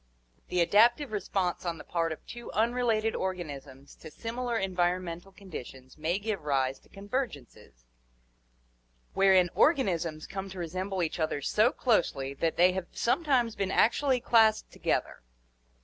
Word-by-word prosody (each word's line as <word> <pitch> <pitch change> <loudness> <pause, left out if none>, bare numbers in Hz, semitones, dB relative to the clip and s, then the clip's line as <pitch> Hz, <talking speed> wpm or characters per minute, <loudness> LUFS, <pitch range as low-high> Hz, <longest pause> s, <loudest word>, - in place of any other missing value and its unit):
The 180 - +1
adaptive 235 - +4
response 195 -3 -2
on 170 -2 -3
the - - -10
part 165 -1 -1
of 160 - -7
two 240 0 -9
unrelated 225 -1 +1
organisms 145 -7 -5
to 160 - -11
similar 235 +6 -3
environmental 180 -1 -1
conditions 135 -9 -10
may 160 +4 -1
give 210 -2 -3
rise 135 -2 0
to - - -26
convergences, 195 - -6 1.3
wherein 190 -2 +4
organisms 170 - +1
come 195 0 -6
to 190 - -10
resemble 185 +2 -3
each 165 - -3
other 155 -2 0
so 215 - +2
closely 140 - 0
that 160 +4 -1
they 180 +1 +6
have 185 -1 -4
sometimes 250 -4 +1
been 195 -1 -2
actually 255 +5 +3
classed 220 -2 +3
together. - - -2
190 Hz, 135 wpm, -29 LUFS, 165-225 Hz, 1.3 s, they